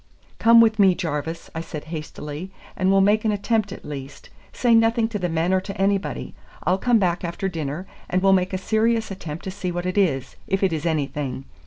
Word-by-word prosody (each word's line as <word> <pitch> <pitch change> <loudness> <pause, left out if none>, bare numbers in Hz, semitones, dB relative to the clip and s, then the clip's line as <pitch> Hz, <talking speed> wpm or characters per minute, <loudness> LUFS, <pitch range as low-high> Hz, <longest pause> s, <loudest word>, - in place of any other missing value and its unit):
"Come 230 0 +7
with 220 -1 +3
me, 190 -3 +6
Jarvis," 165 -1 -4
I 165 - -3
said 155 -2 -7
hastily, 155 +2 -6 0.3
"and 185 -1 +1
we'll 195 0 +5
make 210 +2 +3
an 220 - +2
attempt 205 0 0
at - - -9
least. 140 -1 -8 0.2
Say 240 -2 +2
nothing 225 0 +4
to 210 -3 -3
the 180 -1 -1
men 165 +3 +1
or 190 - +3
to 195 0 -7
anybody. 195 0 0 0.3
I'll 185 +2 +2
come 245 +1 +3
back 180 -2 0
after 175 +3 -2
dinner, 160 -1 -4 0.2
and 185 +1 +1
we'll 195 0 +6
make 185 -1 +2
a 190 - -1
serious 220 +2 +1
attempt 170 -4 -6
to 190 - -4
see 185 -1 -4
what 175 +1 -3
it 185 +2 0
is, 135 -9 0
if 195 +1 0
it 190 -3 +2
is 155 +1 -2
anything. 140 -4 -2
185 Hz, 215 wpm, -23 LUFS, 160-205 Hz, 0.3 s, Come